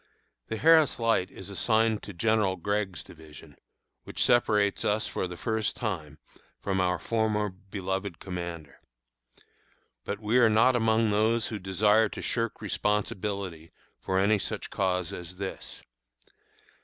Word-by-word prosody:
The 110 - -3
Harris 160 +2 +5
Light 115 -5 +1
is 95 +1 -10
assigned 110 +2 +2
to - - -8
General 105 0 +1
Gregg's 95 -3 -2
division, 80 -2 -14 0.5
which - - -1
separates 105 -5 +3
us, 105 +1 +1
for 95 - -3
the 90 0 -8
first 110 +1 -1
time, 80 - -4 0.4
from 95 -1 -1
our 90 0 +1
former 110 0 0
beloved 95 -1 -5
commander. 85 -5 -7 1.2
But 100 - -4
we 110 +3 +2
are 120 -2 +6
not 115 +4 +4
among 110 -1 +2
those 110 +2 +2
who 110 - -4
desire 105 +3 +3
to - - -7
shirk 115 -2 -2
responsibility 100 -5 -2 0.3
for 95 - -1
any 100 +2 +3
such - - -4
cause 90 -3 -1
as 90 +1 -7
this. 95 0 -7
100 Hz, 135 wpm, -28 LUFS, 95-110 Hz, 1.2 s, are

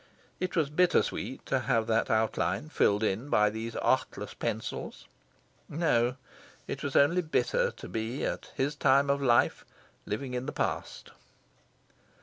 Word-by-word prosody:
It 185 -1 -2
was 155 -4 +1
bitter 180 +3 +4
sweet 130 - -5
to 135 - +1
have 120 -3 +1
that 115 0 +1
outline 110 +7 0
filled 105 -8 +2
in 110 +7 -1
by 105 -4 +3
these 110 +1 -5
artless - - 0
pencils. - - -4 0.6
No, 125 -6 +1 0.5
it - - -5
was 140 - -4
only 165 +6 +5
bitter, 485 - +1
to - - -10
be, 115 +4 -3
at - - -4
his 140 +3 -1
time 140 0 +4
of 140 0 0
life, 120 -3 +3 0.4
living 125 +5 -3
in 125 +1 -3
the - - -4
past. - - -3
130 Hz, 145 wpm, -29 LUFS, 115-150 Hz, 0.6 s, only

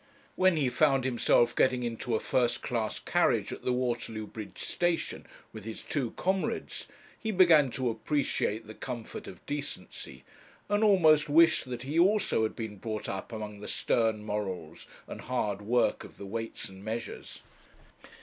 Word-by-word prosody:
When 185 -2 +4
he 140 -4 +2
found 135 +1 +3
himself 120 -1 +3
getting 125 -1 +3
into 115 0 -2
a - - +1
first 120 -2 0
class 115 -3 -1
carriage - - +1
at - - -8
the 125 - 0
Waterloo 120 -3 -2
bridge 105 -2 -9
station 175 -1 -1 0.3
with 110 -2 -8
his 110 +1 -7
two 135 -6 -1
comrades, 190 +1 -2 0.3
he 220 - -3
began 170 -8 +6
to 130 -2 -1
appreciate 115 -3 -1
the 110 - -9
comfort 120 -1 -7
of - - -11
decency, 145 -10 -5 0.4
and 205 +1 +2
almost 160 -8 +5
wished 160 +1 +5
that 125 -1 -5
he 145 +5 0
also 195 - +3
had 110 - 0
been 110 -3 -5
brought 110 +1 -4
up 95 +4 -5
among 105 -2 -6
the 105 - -8
stern 110 -2 +1
morals 95 -6 -4 0.2
and - - -8
hard 105 -5 -2
work 120 +4 +1
of - - -13
the 100 - -8
Weights 115 +2 -5
and 95 0 -12
Measures. 110 0 -6
120 Hz, 160 wpm, -30 LUFS, 110-150 Hz, 0.4 s, began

